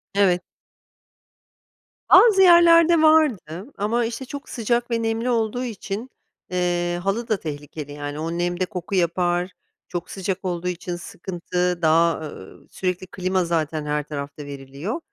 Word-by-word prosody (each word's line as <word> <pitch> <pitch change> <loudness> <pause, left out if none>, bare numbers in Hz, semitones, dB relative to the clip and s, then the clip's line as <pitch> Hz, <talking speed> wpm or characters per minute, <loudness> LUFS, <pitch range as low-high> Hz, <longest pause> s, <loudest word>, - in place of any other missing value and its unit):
Evet. 185 -3 +3 1.7
Az 430 -5 +7
yerlerde 340 -2 +7
vardı, 255 - +2
ama, 230 +4 0
işte, 240 +3 -5
çok 285 +2 -8
sıcak 240 0 -1
ve 230 0 +1
nemli 225 +2 -1
olduğu 235 +1 0
için, 220 +1 -5 0.4
ııı, 175 -1 0
halı 195 +6 -2
da 215 - +1
tehlikeli 145 -1 -7
yani, 145 0 -6
o 165 +1 -3
nemde 175 +1 0
koku 180 0 -5
yapar, 175 +1 +1 0.4
çok 175 -1 -5
sıcak 190 0 -3
olduğu 180 -1 -2
için 175 0 -3
sıkıntı, 180 0 -3
daha, 165 +1 +4
ııı, 120 -11 -10
sürekli, 185 0 -3
klima 185 0 -1
zaten 160 -2 -1
her 150 0 -1
tarafta 145 0 -7
veriliyor. 140 - -6
180 Hz, 135 wpm, -23 LUFS, 170-230 Hz, 1.7 s, Az